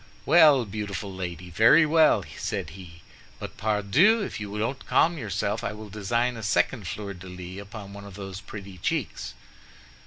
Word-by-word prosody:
"Well, 150 -5 +6
beautiful 100 -1 -5
lady, 90 -1 -6
very 115 - +6
well," 155 0 +4
said 80 - -4
he; 85 -2 -12 0.3
"but, - - -8
pardieu, 110 - +3
if - - -5
you 105 0 -5
don't 115 +5 -2
calm 170 0 +3
yourself, 105 0 -2
I - - -2
will 105 0 -9
design 115 +4 -1
a - - -6
second 105 0 0
fleur 100 0 -5
de 90 0 -11
lis 90 +1 -8
upon 100 -1 -10
one 100 0 -9
of 100 -2 -11
those 95 -1 -7
pretty 100 -2 -10
cheeks!" 65 - -3
105 Hz, 165 wpm, -26 LUFS, 95-115 Hz, 0.3 s, Well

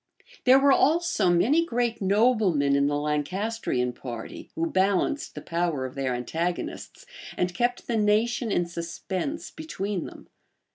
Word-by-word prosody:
There 260 +1 +8
were 275 +1 +5
also 320 - +3
many 245 - +3
great 240 -6 -1
noblemen 195 - +3
in 140 0 +3
the 145 0 0
Lancastrian 150 - -1
party, 120 -3 -8
who 165 - 0
balanced 190 - 0
the - - -6
power 170 -5 -1
of 130 - -6
their 135 -2 -1
antagonists, 170 - -4 0.3
and 180 0 0
kept 245 +3 -1
the 235 - -1
nation 220 +2 +1
in 175 - +1
suspense 175 - -4
between 205 - -4
them. - - -13
190 Hz, 140 wpm, -26 LUFS, 160-240 Hz, 0.3 s, There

